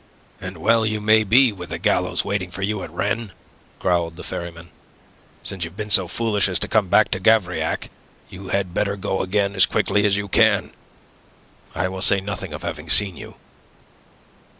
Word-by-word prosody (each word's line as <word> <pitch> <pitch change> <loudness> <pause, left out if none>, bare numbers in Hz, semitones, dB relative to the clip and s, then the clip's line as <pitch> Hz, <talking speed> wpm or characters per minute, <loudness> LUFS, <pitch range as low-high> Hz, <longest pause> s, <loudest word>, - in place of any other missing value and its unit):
"And 90 0 -8
well 115 +8 +2
you 110 -1 -1
may 110 +1 +4
be 120 +4 +4
with 90 -4 -9
the - - -4
gallows - - 0
waiting 100 -2 -2
for 95 +2 -6
you 105 0 -2
at - - -7
Rennes," 105 +5 -3 0.4
growled 85 -2 -1
the - - -10
ferryman. 85 0 -7 0.7
"Since 95 -3 -3
you've 85 +3 -8
been 105 -1 -5
so 95 -3 +6
foolish 105 0 +1
as 90 - +1
to - - +1
come 105 -3 +1
back 110 +4 +3
to 95 - -1
Gavrillac, 100 -3 +1 0.4
you 95 +1 -11
had 95 -3 -2
better 100 +1 -1
go 95 -1 -3
again 100 +1 0
as 95 -2 +5
quickly 105 0 +1
as 100 0 +1
you 100 0 -3
can. - - +2 1.0
I 90 +3 0
will 95 0 -6
say 100 0 +3
nothing 95 -2 -6
of 75 - -8
having - - -6
seen 100 -4 +5
you." - - -11
100 Hz, 185 wpm, -21 LUFS, 90-105 Hz, 1.0 s, so